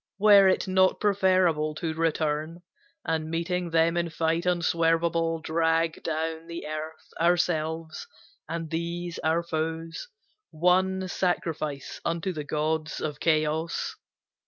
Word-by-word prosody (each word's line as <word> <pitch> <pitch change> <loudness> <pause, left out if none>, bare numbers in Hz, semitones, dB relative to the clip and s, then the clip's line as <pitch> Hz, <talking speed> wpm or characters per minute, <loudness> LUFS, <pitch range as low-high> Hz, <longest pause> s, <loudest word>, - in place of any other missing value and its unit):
Were 200 -1 +7
it 190 - +2
not 185 0 +3
preferable 185 -6 +2
to 160 +1 -3
return, 160 +1 -1 0.4
And 160 -1 -1
meeting 175 +2 -2
them 165 +1 +3
in 170 -1 0
fight 165 +1 0
unswervable, 165 -1 +1
Drag 165 0 +1
down 160 +1 -3
the 170 0 -6
earth, 155 +1 -7
ourselves, 165 - 0 0.4
and 165 -1 -4
these 170 +1 -3
our 160 +2 +1
foes, 165 - -4 0.4
One 185 +3 +2
sacrifice 160 -6 -2
unto 170 +3 -1
the 150 -2 -4
gods 155 +1 -2
of 150 -2 -4
Chaos? 160 0 0
165 Hz, 115 wpm, -27 LUFS, 160-175 Hz, 0.4 s, Were